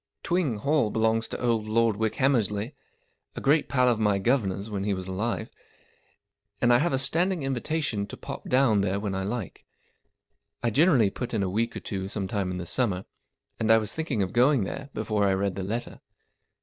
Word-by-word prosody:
Twing 170 -10 0
Hall 140 0 +1
belongs 110 +1 +1
to - - -5
old 115 -3 0
Lord 115 0 +2
Wickhammersiey, 110 0 0 0.6
a - - -4
great 145 +3 +2
pal 125 -2 +3
of 120 -3 +2
my 105 -2 +2
guv'nor's 100 -3 0
when 100 -3 -3
he 100 -1 0
was 95 0 -6
alive, 105 +5 -3 1.1
and 120 0 +4
I 120 - +5
have 170 +5 +1
a 135 - +1
standing 165 +5 +1
invitation 135 -5 -2
to - - -9
pop - - -8
dow 130 -1 +4
n 105 -2 +3
there 100 0 0
when 100 -1 -3
I 95 - -2
like. 105 0 -5 1.0
I 120 - +1
generally 135 - +4
put 120 +1 -4
in 100 - +1
a 95 - -1
week 115 +3 -1
or - - -5
two 95 -2 -4
some 100 -1 -3
time 100 -2 -2
in 90 - -3
the 90 - -5
summer, 95 -2 -1 0.5
and 110 - 0
I 115 - +7
was 110 -2 -1
thinking 150 -10 -1
of 95 - -4
going 125 0 +4
there 135 +8 -6
before 110 -1 0
I 95 -1 +3
read 100 0 -1
the 95 - -5
letter. 110 +6 -4
110 Hz, 200 wpm, -27 LUFS, 100-130 Hz, 1.1 s, I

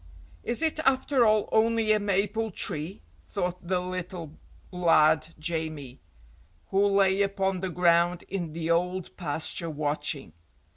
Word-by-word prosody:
"Is 240 +7 0
it 315 -1 +1
after 265 -3 +3
all 215 -1 +3
only 225 0 +2
a 215 - +4
maple 205 +2 0
tree?" 160 - -1 0.2
thought 175 - -4
the 185 0 +1
little 180 -3 -6 0.3
lad 160 -4 +3
Jamie, 155 -5 -4 0.7
who 200 +1 +3
lay 195 -1 +3
upon 195 -1 0
the 190 0 -3
ground 175 0 +2
in 175 -5 -5
the 165 0 -2
old 180 +1 -1
pasture 165 0 -4
watching. 145 - -2
180 Hz, 130 wpm, -27 LUFS, 160-200 Hz, 0.7 s, a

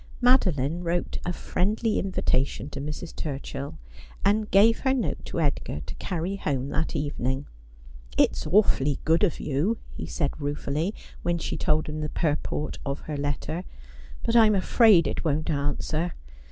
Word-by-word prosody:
Madoline 180 - +3
wrote 175 +1 -1
a - - +1
friendly 210 +5 0
invitation 145 -7 0
to 140 - -5
Mrs. 150 +3 -6
Turchill, 140 -1 -5 0.5
and 210 +1 +3
gave 220 +4 +5
her 265 -1 +2
note 245 - -2
to - - -3
Edgar 140 - -1
to - - -7
carry 180 +2 -3
home 140 -6 -1
that 160 +3 -1
evening. 140 -2 -1 0.4
' - - -22 0.3
It's - - +2
awfully 150 -8 +3
good 165 +5 +3
of 185 - +2
you,' 155 +11 0 0.2
he - - -6
said 150 -1 -2
ruefully, 145 +6 -2 0.3
when 175 0 0
she 165 - -3
told 155 0 +1
him 155 0 -4
the 150 - -2
purport 150 -1 -1
of 140 0 -3
her 155 - -5
letter, 145 +4 -2 0.6
'but 230 - 0
I'm 220 -3 +7
afraid 195 -2 +5
it - - -2
won"t 155 0 0
answer. 150 +4 -1
160 Hz, 155 wpm, -26 LUFS, 145-195 Hz, 0.6 s, I'm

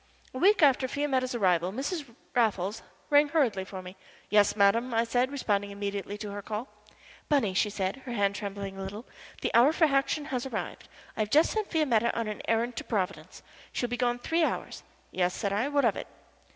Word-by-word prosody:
A 255 - -5
week 390 +2 +5
after 265 -2 +4
Fiametta's 260 -3 -1
arrival 180 -5 +2
Mrs. 285 - -3 0.3
Raffles 215 -4 +1 0.3
rang 290 +1 +6
hurriedly 255 -12 +1
for 190 -1 -8
me. 180 +1 -10 0.4
"Yes, 205 -1 +4
madam," 230 +4 +3
I 230 - +3
said, 245 +3 0
responding 205 -7 -1
immediately 200 0 -4
to 210 -1 -6
her 205 0 -5
call. 215 +5 -5 0.6
"Bunny," 270 -10 +2
she 210 +2 +2
said, 195 0 -2
her 260 -2 -9
hand 200 -3 +1
trembling 200 -1 -5
a - - -4
little, 205 +5 -6 0.4
"the - - -2
hour 240 +6 +6
for 320 0 +3
action 275 +1 +1
has 250 -1 -1
arrived. - - -5 0.3
I - - -11
have 215 -1 0
just 305 +6 +4
sent 435 -2 -2
Fiametta 240 -9 +1
on 230 - -2
an 210 -1 -5
errand 230 +1 0
to - - -3
Providence. 195 -6 -3 0.3
She - - -1
will 240 - -6
be 245 - -1
gone 240 -1 +1
three 325 +7 0
hours." - - -2 0.3
"Yes!" 180 -1 0
said 200 -3 -2
I. 220 +7 +1
"What 285 -2 +2
of 225 - +3
it?" - - -6
230 Hz, 205 wpm, -28 LUFS, 200-270 Hz, 0.6 s, rang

